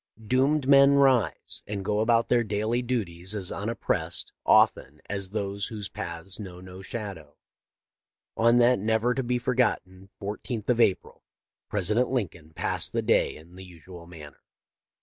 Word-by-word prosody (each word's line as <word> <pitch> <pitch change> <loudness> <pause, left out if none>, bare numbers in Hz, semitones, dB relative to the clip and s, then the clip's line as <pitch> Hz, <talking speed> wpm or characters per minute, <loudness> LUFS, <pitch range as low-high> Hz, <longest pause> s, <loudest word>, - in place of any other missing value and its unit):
Doomed 135 +4 +2
men 140 0 +6
rise 135 -5 +2
and 100 -2 -5
go 105 +1 0
about 115 +1 +2
their 120 -1 +3
daily 110 +3 -1
duties 100 -6 -3
as 95 -3 -2
unoppressed, 110 +3 -2 0.2
often, 75 +3 +3
as 100 -2 -3
those 100 -1 -3
whose 105 -3 -6
paths 85 +3 -5
know 90 -4 -8
no 90 +1 -11
shadow. 100 0 -7 1.0
On 115 +1 +4
that 120 0 +4
never 110 +4 +1
to 135 - -1
be 125 0 -1
forgotten 115 -7 -1
14th 105 +2 -5
of 120 -1 +2
April 100 -5 +1 0.5
President 105 +5 +1
Lin 120 -9 0
coln 80 -1 -18
passed - - -1
the - - 0
day - - +2
in 80 +3 -15
the 95 - -10
usual 90 -1 -13
manner. 80 -4 -12
105 Hz, 150 wpm, -26 LUFS, 95-120 Hz, 1.0 s, men